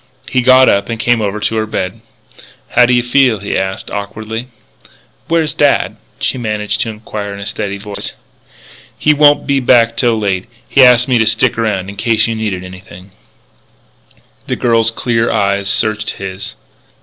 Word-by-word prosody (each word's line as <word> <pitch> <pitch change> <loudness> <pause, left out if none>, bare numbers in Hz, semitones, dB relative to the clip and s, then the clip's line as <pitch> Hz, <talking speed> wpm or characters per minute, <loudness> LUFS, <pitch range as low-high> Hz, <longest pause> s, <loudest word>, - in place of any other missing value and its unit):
He 130 - +1
got 130 +1 +6
up 100 +2 +2
and 115 -1 -3
came 120 0 +2
over 105 0 -2
to 110 +1 -1
the 110 - -2
bed. 95 -4 -4 0.7
"How 125 - +4
do 125 - +2
you 120 - +2
feel?" 125 -2 +3
he 100 0 -4
asked, 95 0 -3
awkwardly. 110 +3 -5 0.8
"Where 165 0 +2
is 155 - -3
dad?" 145 -1 +1 0.2
she 130 - -1
managed 105 -2 -2
to 115 - -1
inquire 105 -1 -6
in - - -9
a 100 - -6
steady 100 0 -4
voice. 100 0 -7 0.8
"He 150 - +3
won't 145 0 +4
be 140 -1 +1
back 115 -2 +3
till 115 -1 +1
late. 95 -3 -2 0.2
He 135 - +5
asked 125 0 +6
me 125 -3 +2
to 110 - +2
stick 115 +3 +2
around 105 -5 -1
in 100 0 -9
case 110 0 +1
you 115 - -1
needed 105 -5 -3
anything 90 0 -12 0.7
" - - -35
The - - -1
girl's 115 -2 +2
clear 115 0 -1
eyes 100 -2 0
searched 110 0 0
his. 95 0 -7
110 Hz, 180 wpm, -14 LUFS, 100-120 Hz, 0.8 s, got